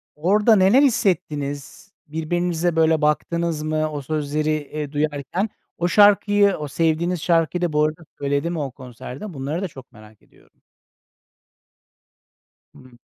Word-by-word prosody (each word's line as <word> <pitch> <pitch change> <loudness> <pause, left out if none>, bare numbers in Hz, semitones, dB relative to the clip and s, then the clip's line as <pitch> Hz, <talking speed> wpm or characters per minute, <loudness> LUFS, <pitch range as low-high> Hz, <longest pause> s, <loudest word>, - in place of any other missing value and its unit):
orada 210 +8 +3
neler 195 +8 +5
hissettiniz 180 - -1 0.2
birbirinize, 170 +2 -1
böyle, 160 -1 +3
baktınız 160 +1 0
mı 155 0 -1
o 145 -1 -4
sözleri, 155 +1 -2
eee, 150 -1 -4
duyarken? 150 - -2 0.3
O 175 - 0
şarkıyı 205 +1 +4
o 150 -1 -5
sevdiğiniz 165 +3 0
şarkıyı 170 +1 +1
da 175 -3 -1
bu 150 0 +3
arada 155 +2 -2
söyledi 140 +3 -1
mi 170 - -3
o 140 -3 -3
konserde? 130 - -9
Bunları 140 +5 -4
da 195 - -2
çok 135 -5 -14
merak 110 -2 -17
ediyorum. - - -27 2.1
Hıı. 130 -1 -17
155 Hz, 135 wpm, -22 LUFS, 145-175 Hz, 2.1 s, neler